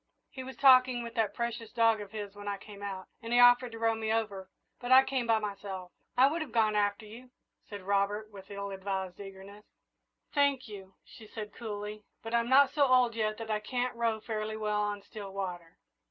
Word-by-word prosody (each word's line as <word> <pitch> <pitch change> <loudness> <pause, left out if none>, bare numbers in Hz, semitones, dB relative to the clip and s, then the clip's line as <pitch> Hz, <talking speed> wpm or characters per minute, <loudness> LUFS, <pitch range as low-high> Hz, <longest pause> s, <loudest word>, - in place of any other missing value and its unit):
He 260 - -7
was 265 +1 -9
talking 255 -2 +6
with 235 0 -7
that 215 -3 0
precious 235 -1 -4
dog 225 -2 +3
of 205 - -8
his 205 -2 -6
when 205 0 -9
I 200 -1 -2
came 200 0 -12
out, 195 -2 -5 0.2
and 230 0 -7
he 240 - +3
offered 245 0 +6
to - - -7
row 225 0 +2
me 220 0 -2
over, 205 -4 -2 0.3
but 245 +1 -4
I 260 +1 +9
came 260 -3 -2
by 225 -1 +4
myself." 200 -3 -5 0.3
"I 255 - +7
would 315 +5 +1
have 300 -6 -5
gone 220 -2 +2
after 205 +1 0
you," 235 +4 -12 0.4
said 205 -2 -8
Robert, 200 +2 0
with 195 -2 -12
ill 200 0 -5
advised 190 -1 -4
eagerness. 195 +1 -11 0.7
"Thank 280 -3 +2
you," 195 -3 -11
she 220 - -14
answered 210 -1 -7
coolly; 210 -2 -6 0.2
"but 225 +1 -6
I'm 235 0 +2
not 275 +1 +6
so 285 -2 +3
old 250 -2 +4
yet 215 -1 -1
that 225 -1 -5
I 210 - +1
can't 245 +3 -2
row 230 -2 0
fairly 215 0 -4
well 210 -1 0
on 205 -1 -2
still 205 -1 -9
water." 180 -4 -6
215 Hz, 210 wpm, -30 LUFS, 200-235 Hz, 0.7 s, I